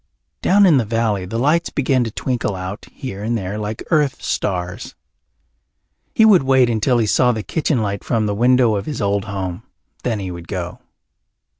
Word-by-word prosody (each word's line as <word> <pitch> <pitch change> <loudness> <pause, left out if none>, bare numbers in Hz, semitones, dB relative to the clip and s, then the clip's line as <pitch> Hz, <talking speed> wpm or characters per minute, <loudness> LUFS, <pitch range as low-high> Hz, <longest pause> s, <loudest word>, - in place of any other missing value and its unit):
Down 200 +2 +5
in 165 -6 +5
the 125 - +2
valley 110 -3 -1
the 115 +5 -4
lights 150 +7 +2
began 130 -2 +1
to - - -3
twinkle 115 -2 -2
out 95 +3 -6
here 100 -7 -7
and 115 +2 0
there 100 +1 -4
like 105 +1 -4
earth 150 -4 +2
stars. 90 -2 -3 1.2
He 220 - +6
would 205 -5 +6
wait 130 -2 +3
until 115 +3 +1
he 115 - +2
saw 125 +4 +3
the 110 -3 -3
kitchen 145 -5 0
light 100 -1 -3
from 115 -3 0
the 105 - -1
window 120 +1 +3
of 100 - -4
his 150 - -4
old 100 -1 0
home. 95 -2 -4 0.4
Then 120 -3 -1
he 95 -2 -5
would 85 -1 -9
go. 90 -3 -5
110 Hz, 185 wpm, -19 LUFS, 100-130 Hz, 1.2 s, He